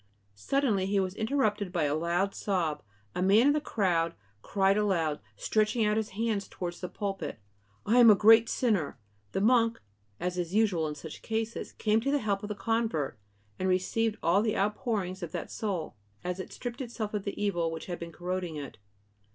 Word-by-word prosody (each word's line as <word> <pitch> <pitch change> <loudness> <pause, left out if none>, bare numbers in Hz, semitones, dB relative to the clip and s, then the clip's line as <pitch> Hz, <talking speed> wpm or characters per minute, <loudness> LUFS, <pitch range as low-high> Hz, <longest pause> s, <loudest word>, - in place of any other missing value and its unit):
Suddenly 200 - +1
he 200 0 +2
was 185 -1 -1
interrupted 215 -4 0
by 175 -4 0
a 145 -1 +1
loud 170 +5 0
sob, 165 -7 -1 0.3
and 180 - -1
a - - +2
man 215 +5 +6
in 290 - +5
the 300 - 0
crowd 170 - 0 0.3
cried 195 - +2
aloud, 175 -8 +1 0.2
stretching 215 +1 +1
out 210 0 +2
his 220 0 -1
hands 220 -3 0
towards 175 -1 -6
the 180 - -4
pulpit: 195 - -4 0.5
"I 235 +4 +4
am 235 -2 +9
a 210 - +9
great 225 +3 +6
sinner!" 210 - 0 0.4
The - - 0
monk, 230 +1 +4 0.4
as 180 0 -2
is 175 +2 -3
usual 195 -8 +2
in 150 - -4
such 155 +1 -9
cases, 225 +1 -3
came 215 +1 +1
to 275 - -1
the 290 - +3
help 205 -6 -1
of 210 - -6
the 210 - -3
convert, 200 - -1 0.4
and 185 - 0
received 215 +4 +1
all 175 +5 +4
the 215 0 0
outpourings 200 -2 -1
of 170 -2 -6
that - - -4
soul, 190 -7 -3 0.3
as 180 +1 -3
it 185 - -6
stripped 245 +1 -6
itself 225 -4 -4
of 205 -2 -2
the 200 - -5
evil 175 -5 0
which 165 0 -6
had 175 -2 -5
been 170 0 -6
corroding 180 -1 -3
it. 140 -6 -7
200 Hz, 195 wpm, -29 LUFS, 175-220 Hz, 0.5 s, am